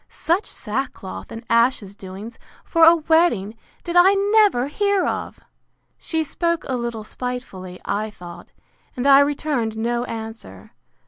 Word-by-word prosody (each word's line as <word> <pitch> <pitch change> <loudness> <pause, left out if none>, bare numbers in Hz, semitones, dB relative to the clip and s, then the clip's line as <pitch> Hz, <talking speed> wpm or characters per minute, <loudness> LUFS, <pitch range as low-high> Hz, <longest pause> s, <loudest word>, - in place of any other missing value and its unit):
Such 345 +6 -1
sackcloth 225 -3 -5
and 225 +1 -8
ashes 230 -4 +2
doings, 200 +4 -10 0.3
for 330 -1 +4
a 330 +1 +8
wedding, 320 - +2 0.3
did 345 -1 -5
I 370 +3 +6
never 405 - +3
hear 400 +5 +1
of!—She 320 -1 -6
spoke 335 +2 -2
a 260 - -1
little 235 -2 -4
spitefully, 210 -7 -6
I 215 +2 -2
thought; 175 -4 -12 0.5
and 250 - -2
I 275 0 +8
returned 280 -6 0
no 235 +2 -1
answer. 220 - -8
245 Hz, 130 wpm, -22 LUFS, 220-325 Hz, 0.5 s, a